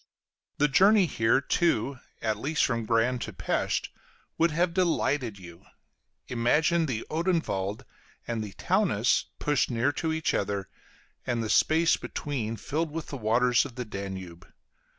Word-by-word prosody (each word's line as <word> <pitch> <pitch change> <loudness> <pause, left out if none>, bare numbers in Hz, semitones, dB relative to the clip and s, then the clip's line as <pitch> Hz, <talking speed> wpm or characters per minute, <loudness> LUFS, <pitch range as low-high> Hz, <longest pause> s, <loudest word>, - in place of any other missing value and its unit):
The 150 - +4
journey 195 +8 +5
here, 115 -4 +2
too, 140 -4 0 0.2
at 110 -2 0
least 150 +5 +1
from 115 -3 -2
Gran 120 +2 +2
to - - -5
Pesth, - - -1 0.5
would 165 +1 +3
have 170 +2 0
delighted 145 - 0
you. 85 -3 -13 0.6
Imagine 155 +8 +2
the 115 -5 -3
Odenwald 155 - -1 0.4
and 115 -2 -2
the 100 -2 -8
Taunus - - +1
pushed 150 -1 +1
near 120 +3 +1
to 160 +2 -2
each 160 0 0
other, 100 -1 -2 0.6
and 120 -2 0
the 110 - -2
space 165 +1 +4
between 120 -7 -4
filled 160 +7 -2
with 160 +1 -6
the - - -5
waters 120 +2 +3
of 120 - -9
the 125 - -4
Danube. 95 -4 -7
125 Hz, 145 wpm, -28 LUFS, 110-160 Hz, 0.6 s, journey